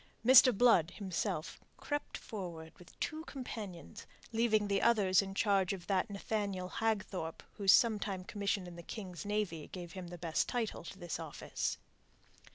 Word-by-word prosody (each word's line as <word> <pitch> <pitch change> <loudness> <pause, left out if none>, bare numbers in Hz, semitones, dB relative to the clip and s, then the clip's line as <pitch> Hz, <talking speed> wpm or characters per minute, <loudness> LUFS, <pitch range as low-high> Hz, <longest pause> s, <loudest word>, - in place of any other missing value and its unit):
Mr. 255 0 +9
Blood, 200 -7 +4
himself, 185 -5 -3 0.2
crept 290 -1 -3
forward 170 -6 -7
with 180 - -17
two 310 +1 -3
companions, 215 - -7 0.2
leaving 220 -2 +2
the 200 -1 +1
others 205 -5 +4
in 195 - -5
the - - -7
charge 200 -3 +2
of 185 -3 -7
that 195 +2 +1
Nathaniel 200 -2 -2
Hagthorpe 200 -6 -2
whose 200 -3 +5
sometime 205 -5 +3
commission 200 -1 -2
in 175 -1 -9
the - - -7
King's 180 -2 -7
Navy 205 -7 -2
gave 175 -2 -8
him 185 -2 -7
the 175 0 -8
best 165 -2 0
title 235 -4 -2
to 195 - -8
this 175 -3 -4
office. 160 -3 -3
195 Hz, 160 wpm, -34 LUFS, 180-220 Hz, 0.2 s, Mr